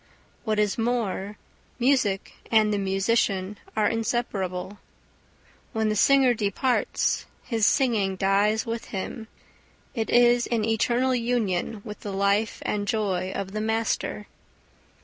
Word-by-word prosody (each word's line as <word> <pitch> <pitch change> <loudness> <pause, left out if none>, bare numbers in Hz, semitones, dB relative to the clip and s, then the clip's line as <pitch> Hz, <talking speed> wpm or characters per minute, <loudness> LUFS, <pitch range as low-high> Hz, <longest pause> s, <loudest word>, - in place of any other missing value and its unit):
What 215 -2 0
is 210 +1 +1
more, 220 -4 -1 0.4
music 240 -6 +1 0.2
and 215 -2 +4
the 205 - 0
musician 195 0 0 0.2
are 210 -1 +3
inseparable. 205 -5 -2 0.9
When 220 -1 +1
the 215 - 0
singer 265 +3 +5
departs, 225 +4 0 0.2
his 225 -4 +1
singing 220 -8 +2
dies 200 +3 +2
with 230 0 -4
him; 220 +3 -5 0.7
it 225 -4 -2
is 240 0 +4
in 225 -3 0
eternal 240 +3 +1
union 230 -4 -1
with 210 -2 -7
the 205 - -6
life 200 +2 0
and 205 -1 -1
joy 190 -4 -1
of 195 -1 -4
the 215 +1 -3
master. 220 -1 -1
215 Hz, 125 wpm, -25 LUFS, 200-235 Hz, 0.9 s, singer